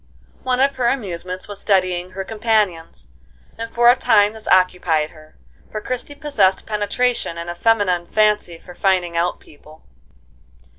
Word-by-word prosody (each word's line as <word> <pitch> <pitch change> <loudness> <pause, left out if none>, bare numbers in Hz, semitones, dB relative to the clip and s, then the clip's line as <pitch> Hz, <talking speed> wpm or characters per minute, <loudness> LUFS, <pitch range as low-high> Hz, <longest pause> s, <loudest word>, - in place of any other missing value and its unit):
One 255 -1 -1
of 275 +1 +2
her 245 -2 +1
amusements 185 -7 -3
was 205 -1 -8
studying 185 -3 +1
her 195 +1 -4
companions, 195 - -1 0.5
and 230 0 -6
for 240 +1 +2
a - - +3
time 210 -4 +3
this 220 -1 -13
occupied 180 -4 +2
her, 155 -1 -18 0.3
for 215 - -4
Christie 255 +6 -5
possessed 225 -11 +1
penetration 210 -2 -1
and 170 +1 -5
a - - -5
feminine 185 -3 +1
fancy 210 -5 +1
for 180 +2 -14
finding 180 -2 0
out 170 +1 0
people. 155 +1 -18
195 Hz, 150 wpm, -20 LUFS, 175-225 Hz, 0.5 s, a